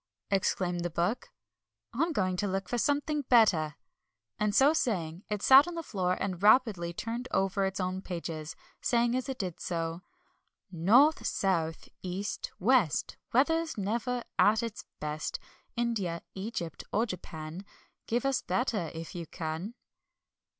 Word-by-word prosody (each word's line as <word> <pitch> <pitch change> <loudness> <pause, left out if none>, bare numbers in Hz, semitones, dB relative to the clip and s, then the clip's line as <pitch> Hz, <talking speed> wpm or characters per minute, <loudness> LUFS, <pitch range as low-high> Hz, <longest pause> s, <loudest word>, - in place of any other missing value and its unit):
exclaimed 185 -2 +1
the 175 - -1
Book. 175 +8 -1 0.6
"I'm 325 +8 +1
going 185 - 0
to 205 - 0
look 195 -1 -2
for 245 - -1
something 290 +3 +1
better," 170 - +4 0.6
and 210 -1 +1
so 280 +3 +6
saying, 180 - -1
it 210 -1 -2
sat 270 +4 +8
on 350 - -5
the 330 - -4
floor 185 - -1
and 185 -2 -3
rapidly 210 -6 +4
turned 230 +7 -4
over 195 +1 +1
its 190 0 -2
own 185 0 -2
pages, 165 -4 -5 0.3
saying 240 0 +2
as 255 +1 -2
it 265 - -3
did 180 -4 -4
so: 165 0 -3 0.7
"North, 230 - +5
South, 165 -5 -1
East, 190 +2 -4
West, 220 - +2
Weather's 325 +5 +2
never 235 +4 -1 0.2
at 220 +3 +5
its 230 -2 -5
best. 150 0 -3 0.4
India, 210 -8 -1
Egypt, 190 -4 -5
or 220 +3 +2
Japan, 175 -3 -7 0.4
Give 240 +4 0
us 275 -1 +1
better, 215 -9 -1
if 165 0 -7
you 170 -2 -6
can." 165 +8 -5
195 Hz, 145 wpm, -30 LUFS, 175-240 Hz, 0.7 s, sat